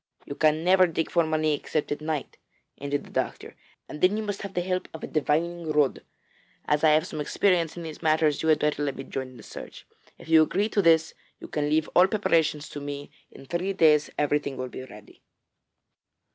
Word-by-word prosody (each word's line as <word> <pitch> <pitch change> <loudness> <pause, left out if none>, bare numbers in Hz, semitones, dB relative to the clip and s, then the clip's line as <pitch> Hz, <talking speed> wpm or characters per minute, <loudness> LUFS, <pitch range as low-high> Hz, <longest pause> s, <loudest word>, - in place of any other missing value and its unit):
'You - - -6
can 155 +2 +2
never 185 +1 +5
dig 165 -1 -2
for 170 - +3
money 155 -1 +1
except 150 +1 -2
at 145 - -2
night,' 155 -2 -4 0.4
ended 140 0 -2
the - - -15
doctor, - - -3 0.3
'and 150 - -9
then 190 +3 +4
you 220 - -2
must 205 -1 -4
have 200 -1 -7
the 175 - +1
help 185 +1 -2
of 160 - -9
a - - -3
divining 160 +3 -1
rod. 150 -3 +1 0.6
As 150 +1 +1
I 160 - +6
have 155 +2 +3
some 155 -4 -5
experience 170 +1 +1
in 170 - -6
these 160 -2 -8
matters, 155 -2 +2
you 160 - 0
had 155 - +5
better 150 -1 0
let 140 -2 -1
me 135 - -6
join 130 -1 -5
in 130 -1 -14
the - - -13
search. - - -10 0.3
If - - -14
you 160 -1 +6
agree 195 +7 +1
to 205 - +1
this, 165 -2 +4 0.3
you - - -9
can 145 -1 -2
leave 155 +1 +2
all 180 +1 +7
preparations 160 -7 +1
to 145 - -7
me. 145 0 -6 0.2
In 135 - -14
three 175 +6 -2
days 155 -5 +4
everything 145 -2 0
will 130 0 -4
be 130 - -8
ready.' 105 -4 -15
155 Hz, 215 wpm, -26 LUFS, 145-170 Hz, 0.6 s, all